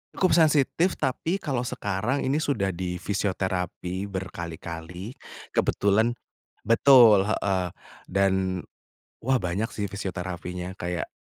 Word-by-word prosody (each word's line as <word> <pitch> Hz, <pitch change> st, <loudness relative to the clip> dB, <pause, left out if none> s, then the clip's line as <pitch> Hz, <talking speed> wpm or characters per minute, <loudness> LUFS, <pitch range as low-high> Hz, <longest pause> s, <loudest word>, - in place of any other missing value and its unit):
Cukup 185 Hz, -5 st, +3 dB
sensitif 160 Hz, +2 st, +3 dB
tapi 160 Hz, +7 st, -1 dB
kalau 135 Hz, -8 st, -2 dB
sekarang, 110 Hz, +3 st, -1 dB
ini 135 Hz, -, +1 dB
sudah 105 Hz, -, 0 dB
di 90 Hz, 0 st, -3 dB
fisioterapi 95 Hz, -1 st, -2 dB
berkali-kali, 85 Hz, -, -6 dB, 0.4 s
kebetulan 105 Hz, +4 st, +2 dB, 0.6 s
betul 115 Hz, -4 st, +7 dB
heeh 95 Hz, -3 st, 0 dB, 0.4 s
dan, 95 Hz, -1 st, +1 dB, 0.7 s
wah 130 Hz, +1 st, +2 dB
banyak 95 Hz, +5 st, -2 dB
sih 100 Hz, -1 st, -3 dB
fisioterapinya, 90 Hz, -1 st, -5 dB
kayak 90 Hz, -2 st, -3 dB
100 Hz, 100 wpm, -26 LUFS, 90-120 Hz, 0.7 s, betul